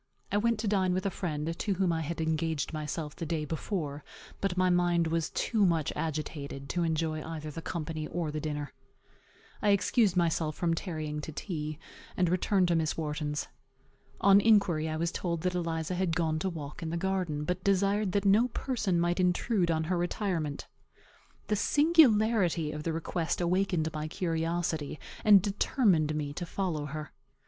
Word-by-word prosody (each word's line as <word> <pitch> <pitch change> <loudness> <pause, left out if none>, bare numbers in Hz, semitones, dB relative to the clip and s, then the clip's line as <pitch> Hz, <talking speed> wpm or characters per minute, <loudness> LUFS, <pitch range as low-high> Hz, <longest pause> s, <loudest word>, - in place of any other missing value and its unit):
I 205 - +2
went 230 +2 +2
to 225 - -2
dine 190 -3 +2
with 185 - -2
a 195 - +1
friend, 160 -2 -3
to 205 - 0
whom 180 -2 +1
I 160 - -1
had 165 +2 -4
engaged 160 -1 -1
myself 150 0 -4
the - - -6
day 155 -1 -1
before; 150 -2 -3 0.4
but 195 -2 -1
my 185 0 +3
mind 175 -1 +3
was 165 0 0
too 220 -3 0
much 165 -5 +2
agitated 145 -3 -4
to 175 - -1
enjoy 160 -1 0
either 155 -2 -6
the 165 - -6
company 155 -2 -4
or 170 -3 -2
the 155 - -3
dinner. 150 -1 -4 0.9
I 210 - +2
excused 200 -1 +3
myself 165 -2 +1
from 170 -1 +1
tarrying 155 -4 -3
to 155 - -6
tea, 155 -2 -4 0.4
and 180 -2 +3
returned 185 +1 +2
to 170 - +3
Miss 160 -1 0
Wharton's. 150 -2 -2 0.7
On 200 0 +6
inquiry, 195 -8 +3
I 155 - -2
was 170 +1 0
told 170 -3 -2
that 180 +1 0
Eliza 165 -1 -2
had 180 -2 0
gone 160 -2 0
to 190 - -1
walk 150 -2 -7
in 165 - -3
the 170 - -2
garden, 180 -5 -1
but 180 +3 -2
desired 200 +1 +2
that 200 0 +1
no 210 +5 +5
person 220 -8 -1
might 175 +2 +1
intrude 180 +1 +2
on 160 -1 +1
her 175 +2 0
retirement. 175 -5 -2 0.8
The 210 - 0
singularity 220 - +4
of 150 0 -5
the 165 - -2
request 165 +1 -2
awakened 175 -2 +1
my 155 0 -3
curiosity, 165 -3 -2 0.2
and 205 -3 +7
determined 195 - +2
me 145 -2 -3
to 175 +4 -4
follow 165 -6 -2
her. 150 +1 -6
170 Hz, 175 wpm, -30 LUFS, 155-190 Hz, 0.9 s, and